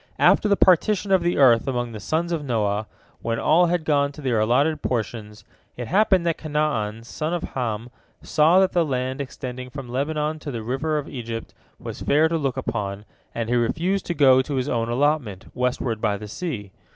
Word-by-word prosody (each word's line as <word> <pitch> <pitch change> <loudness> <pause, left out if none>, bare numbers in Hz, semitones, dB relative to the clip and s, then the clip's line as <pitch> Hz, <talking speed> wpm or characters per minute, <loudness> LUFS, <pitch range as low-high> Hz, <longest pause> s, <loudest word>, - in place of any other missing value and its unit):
After 210 - +4
the 200 - +3
partition 195 +2 +3
of 190 -2 +5
the 175 +1 0
earth 120 -4 +5
among 120 -2 -2
the 110 - -7
sons 165 - -1
of 165 -3 -1
Noah, 105 -5 -1 0.3
when 115 0 -1
all 175 +7 +4
had 170 -2 -1
gone 140 -2 +2
to 150 - -10
their 120 -4 +1
allotted 140 +8 +2
portions, 105 -3 -4 0.3
it 120 -1 -5
happened 190 -2 +3
that 165 -1 0
Canaan 145 -8 -1
son 155 +7 -3
of 175 - -4
Ham 120 -2 -4 0.3
saw 160 +4 +4
that 190 -1 +3
the 175 -2 +2
land 130 -2 -2
extending 130 -2 -7
from 135 +1 -7
the 120 - -10
Lebanon 150 +3 -1
to 150 - -7
the 115 -5 -5
River 135 +6 -1
of 145 - -4
Egypt 115 -3 -6 0.2
was - - -8
fair 155 +3 +3
to 165 - 0
look 135 -4 -2
upon, 100 -2 -3 0.3
and 115 -1 -2
he 120 - +1
refused 165 +11 0
to 175 - -2
go 130 -3 +6
to 140 +2 -4
his 130 0 -1
own 115 -4 -1
allotment, 125 -6 0
westward 125 -3 -1
by 105 -3 +1
the 105 +1 -8
sea. 110 - -5
130 Hz, 200 wpm, -23 LUFS, 115-155 Hz, 0.3 s, go